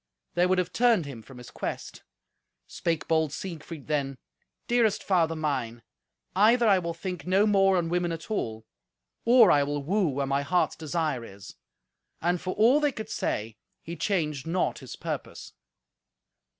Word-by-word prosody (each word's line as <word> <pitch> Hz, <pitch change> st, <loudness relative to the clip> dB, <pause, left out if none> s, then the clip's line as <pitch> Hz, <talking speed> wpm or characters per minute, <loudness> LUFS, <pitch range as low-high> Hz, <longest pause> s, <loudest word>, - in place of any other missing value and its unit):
They 175 Hz, +1 st, +3 dB
would 185 Hz, 0 st, +2 dB
have 180 Hz, 0 st, -1 dB
turned 230 Hz, -8 st, +3 dB
him 135 Hz, -5 st, -8 dB
from 130 Hz, +3 st, -14 dB
his 125 Hz, -, -11 dB
quest. -, -, -6 dB, 0.6 s
Spake 165 Hz, -2 st, -2 dB
bold 160 Hz, -2 st, +2 dB
Siegfried 165 Hz, -3 st, -7 dB
then, 140 Hz, -3 st, -1 dB, 0.5 s
"Dearest 235 Hz, -4 st, +2 dB
father 165 Hz, -4 st, +2 dB
mine, 130 Hz, -7 st, -3 dB, 0.5 s
either 230 Hz, +4 st, +5 dB
I 195 Hz, -3 st, +5 dB
will 170 Hz, -1 st, -4 dB
think 180 Hz, +1 st, -6 dB
no 195 Hz, +3 st, +4 dB
more 195 Hz, -2 st, +4 dB
on 170 Hz, -2 st, 0 dB
women 175 Hz, 0 st, 0 dB
at 165 Hz, +5 st, -7 dB
all, 110 Hz, -, -3 dB, 0.6 s
or 235 Hz, -3 st, +7 dB
I 145 Hz, -, +5 dB
will 145 Hz, 0 st, -2 dB
woo 190 Hz, +5 st, +1 dB
where 140 Hz, -1 st, -1 dB
my 140 Hz, +1 st, 0 dB
heart's 175 Hz, +5 st, +1 dB
desire 155 Hz, -5 st, -2 dB
is." 100 Hz, -3 st, -11 dB, 0.7 s
And 175 Hz, +1 st, 0 dB
for 185 Hz, 0 st, -3 dB
all 235 Hz, +7 st, +5 dB
they 295 Hz, -1 st, +2 dB
could 220 Hz, -3 st, -7 dB
say, 110 Hz, -, -3 dB, 0.3 s
he 170 Hz, -, -6 dB
changed 155 Hz, -5 st, -1 dB
not 180 Hz, +3 st, 0 dB
his -, -, -9 dB
purpose. -, -, -6 dB
170 Hz, 165 wpm, -27 LUFS, 145-195 Hz, 0.7 s, or